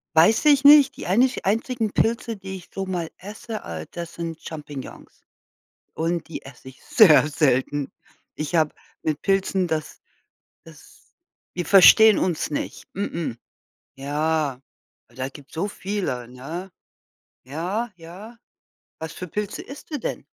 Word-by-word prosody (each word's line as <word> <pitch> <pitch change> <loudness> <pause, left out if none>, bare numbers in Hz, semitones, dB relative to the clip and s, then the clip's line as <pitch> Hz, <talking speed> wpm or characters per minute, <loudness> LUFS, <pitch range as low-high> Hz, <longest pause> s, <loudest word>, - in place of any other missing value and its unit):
Weiß 195 - +5
ich 285 -2 +5
nicht. 290 -1 +8
Die - - -7
einich 245 +8 +2
einzigen 225 +2 0
Pilze, 230 +1 0
die 195 -1 -8
ich 185 - -11
so 195 - -3
mal 175 -3 -3
esse, 215 +3 -7
äh, 80 -1 -6
das 170 -1 -7
sind 165 -1 -5
Champignons. 150 -4 -9 0.7
Und 165 +1 -2
die - - -7
esse 130 -1 -13
ich 130 - -15
sehr 155 -8 +6
selten. 145 -1 0 0.4
Ich 155 +3 -4
habe 155 -2 +2 0.3
mit 155 -1 -1
Pilzen, 195 -1 +1
das 155 -1 -3 0.6
das - - -18 0.4
wir 175 -1 -3
verstehen 210 +2 +8
uns 175 -4 -1
nicht. 145 - -4
Mh-mh. 170 - -3 0.6
Ja, 145 -1 -1 0.5
aber - - -24
da 130 0 -3
gibt's 140 +2 -14
so 190 +6 -1
viele, 190 - -3
ne? 160 +10 -7 0.8
Ja, 185 - -3
ja. 185 +8 -12 0.6
Was 160 0 -6
für 180 - -7
Pilze 210 +4 -4
isst 275 +4 -12
du 295 - -2
denn? - - -4
175 Hz, 140 wpm, -23 LUFS, 150-210 Hz, 0.8 s, nicht